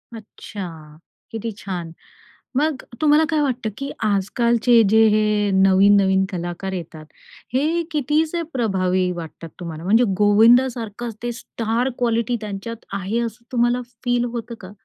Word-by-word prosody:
अच्छा, 175 -8 -9 0.3
किती 225 0 -4
छान. 180 -5 -5 0.7
मग 295 -2 0 0.2
तुम्हाला 305 +1 +5
काय 310 -2 +1
वाटतं, 250 -5 -1
की 275 0 -4
आज-कालचे 230 +3 +3
जे 220 +1 +5
हे 210 -1 +2
नवीन-नवीन 190 0 +4
कलाकार 175 +1 -4
येतात, 165 -3 -7 0.5
हे 315 +6 +1
कितीसे 310 +3 0
प्रभावी 185 -6 0
वाटतात 165 -1 -8
तुम्हाला? 165 -2 -7
म्हणजे 220 +7 +4
गोविंदासारखंच 230 +1 +3
ते 240 - -1
स्टार 230 +1 -2
क्वालिटी 235 0 0
त्यांच्यात 215 +2 -6
आहे, 200 +4 -2
असं 230 +1 -8
तुम्हाला 240 0 +1 0.2
फील 245 0 +1
होतं 235 0 -5
का? 185 - -10
220 Hz, 125 wpm, -21 LUFS, 190-245 Hz, 0.7 s, तुम्हाला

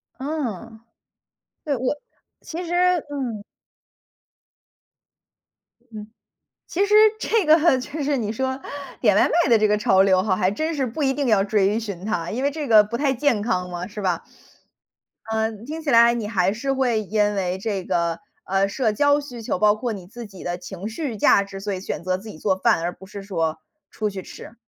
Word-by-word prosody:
嗯。 240 - -5 0.9
对， 285 -3 0
我 255 +4 -1 0.5
其 345 +2 -6
实 345 - -3 0.4
嗯。 245 -7 -4 2.5
嗯。 210 0 -7 0.6
其 390 +4 +1
实 420 +1 +2 0.2
这 440 -6 +1
个 315 -2 +5
就 290 +3 -5
是 285 -1 0
你 215 -3 -2
说 260 +3 -2 0.4
点 - - +3
外 - - +4
卖 340 -6 +2
的 230 - +6
这 215 0 +3
个 210 0 +2
潮 190 -2 +4
流 185 -1 +4
哈， 195 -3 +1
还 185 0 +1
真 315 +10 -2
是 270 -4 -1
不 285 +6 -3
一 270 - +2
定 280 -2 -1
要 205 -4 +4
追 205 +1 +1
寻 200 -4 -6
它， 175 -6 -2
因 240 - -3
为 285 - +3
这 295 -1 -5
个 215 -2 +7
不 220 +3 -4
太 280 -1 +1
健 255 -4 +1
康 180 -6 -1
嘛， 175 0 -5
是 210 0 -7
吧。 180 -3 -1 1.0
啊， 220 0 -1 0.2
听 315 +3 -6
起 305 - -3
来 235 0 +6
你 230 -3 -3
还 190 -2 +1
是 270 +5 -2
会 245 -5 +1
因 210 0 0
为 185 -1 -1
这 195 -2 -3
个， 170 -2 0 0.3
呃， 195 +1 +1
社 225 +1 0
交 285 +5 +3
需 250 -5 -8
求， 215 - -2
包 210 0 +4
括 225 +1 -3
你 190 -3 -8
自 235 +3 -9
己 195 -2 -12
的 175 0 -3
情 190 +2 -7
绪 240 -2 -4
价 200 - +4
值， 195 -1 -9
所 200 0 -3
以 185 - -4
选 190 - -5
择 185 +1 0
自 215 +3 -11
己 155 - -10
做 190 +2 +1
饭， 165 - +2
而 175 - -1
不 190 - -14
是 200 -1 -8
说 165 -5 -2 0.3
出 215 -1 -2
去 190 -1 -6
吃。 230 - -11
215 Hz, 210 characters per minute, -23 LUFS, 195-265 Hz, 2.5 s, 个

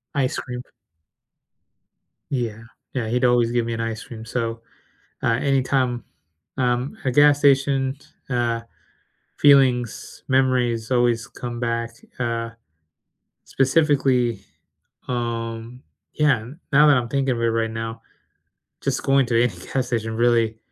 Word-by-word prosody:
Ice 135 0 0
cream. 125 -1 -5 1.7
Yeah. 115 -4 -3 0.3
Yeah, 120 -4 -2
he'd 125 +2 +1
always 120 -1 +3
give 120 -1 +1
me 115 - -3
an 115 - -3
ice 115 -1 -4
cream. 110 -2 -10
So, 115 -1 -3 0.6
uh, 115 0 +2
any 135 -1 +2
time, 125 -3 0 0.5
um, 125 +1 0
a 130 - +1
gas 145 +2 +5
station, 135 -1 +3 0.3
uh, 120 -2 0 0.8
feelings, 130 -5 +3
memories 125 -4 +1
always 120 -2 +2
come 120 -1 -7
back, 115 -1 -1 0.3
uh, 115 -2 -2 0.9
specifically, 135 -5 +2 0.6
um, 115 0 -4 0.3
yeah, 150 -4 +3
n 130 +9 -11
now 150 +2 +7
that 145 -2 +6
I'm 120 -1 -1
thinking 135 -1 0
of 115 - -4
it - - +2
right 115 0 0
now, 115 0 -5 0.8
just - - -1
going 135 -1 +3
to 115 -1 +3
any 120 -4 0 0.2
gas 130 -2 0
station 115 -2 -2
really 115 -1 +2
120 Hz, 130 wpm, -22 LUFS, 115-130 Hz, 1.7 s, now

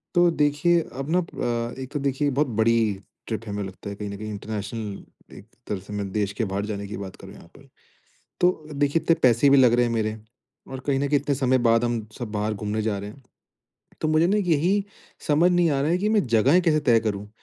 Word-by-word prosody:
तो 175 0 +5
देखिए 160 +3 +2 0.2
अब 135 +3 -4
नप 180 -2 +1 0.5
अ, - - -5
एक 130 - -7
तो 145 - -1
देखिए 140 +1 0
बहुत 140 +2 +1
बड़ी 115 +1 +4 0.5
ट्रिप 110 0 -4
है 105 - -6
हमें 100 0 -3
लगता 95 +2 -8
है 100 - -6
कहीं 105 0 -6
न 100 - -6
कहीं 110 +1 -6
इंटरनेशनल 105 0 -7
एक - - -12 0.2
तरह 100 -3 -2
से 105 - -8
मैं 100 -2 -4
देश 100 -1 -1
के 110 +2 -2
बाहर 100 +1 -1
जाने 100 -1 -5
की 100 - -6
बात 95 -1 -7
करूँ - - -12
यहाँ - - -15
पर। 140 - -18 0.7
तो 175 -4 +1
देखिए 145 +2 +1
इतने 165 +1 +3
पैसे 125 +3 +5
भी 140 - +7
लग 125 -3 +6
रहे 120 0 +3
हैं 115 - -2
मेरे, 110 -1 -1 0.5
और 130 -1 -6
कहीं 135 -2 +1
न 140 - 0
कहीं 145 0 +3
इतने 140 0 -1
समय 130 -1 +2
बाद 115 +1 +3
हम 120 -2 -2
सब 120 -4 -5
बाहर 105 +1 -1
घूमने 105 +1 -3
जा 105 -2 -1
रहे 100 +1 -6
हैं। 135 +6 -16 0.8
तो 155 - 0
मुझे 155 +2 +3
ना 200 +4 +2
यही 185 +2 +1 0.4
समझ 160 +4 +4
नहीं 175 -2 +3
आ 140 -2 +1
रहा 150 - +1
है 175 - +2
कि 210 - 0
मैं 215 -8 +2
जगहें 125 +9 +4
कैसे 155 -3 +2
तय 120 -5 +4
करूँ? 105 -2 -3
125 Hz, 240 wpm, -24 LUFS, 105-150 Hz, 0.8 s, भी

